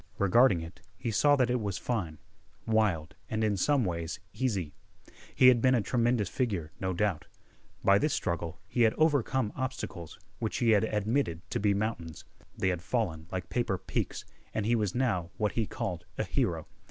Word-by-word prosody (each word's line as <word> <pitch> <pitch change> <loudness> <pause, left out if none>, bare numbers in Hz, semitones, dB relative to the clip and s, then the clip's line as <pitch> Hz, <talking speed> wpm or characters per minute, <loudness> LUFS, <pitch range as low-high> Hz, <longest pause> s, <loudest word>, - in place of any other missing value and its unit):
Regarding 100 -1 +4
it, 85 +2 -9 0.2
he 115 - -3
saw 145 +6 +4
that 125 -3 +2
it 125 -1 0
was 100 -3 -2
fine, 95 -11 -2 0.5
wild, 100 -7 +1 0.2
and, 110 0 -1
in 105 -1 +2
some 130 +6 +2
ways, 85 0 -3
easy. 100 - -1 0.6
He 130 - +7
had 120 -2 +4
been 130 +1 +4
a 120 - +2
tremendous 120 -2 +1
figure, 95 - -2
no 95 0 -1
doubt. 95 -2 -1 0.6
By 100 +1 +5
this 150 - +1
struggle 85 -5 -2
he 120 - -1
had 110 -1 +4
overcome 135 -7 +2
obstacles 130 -10 -5 0.2
which 110 - -2
he 120 -3 +3
had 110 0 +4
admitted 105 - -1
to - - 0
be 100 -1 +2
mountains. 100 -6 -3 0.3
They 95 - +1
had 90 -2 -1
fallen 90 -7 -2
like 90 -1 -4
paper 115 -5 0
peaks, - - -3 0.3
and 110 - 0
he 120 +2 +3
was 105 -5 -1
now 110 -10 0
what 105 -2 +1
he 115 -3 -1
called 90 -8 -4
a - - 0
hero. - - -1
105 Hz, 180 wpm, -30 LUFS, 90-120 Hz, 0.6 s, He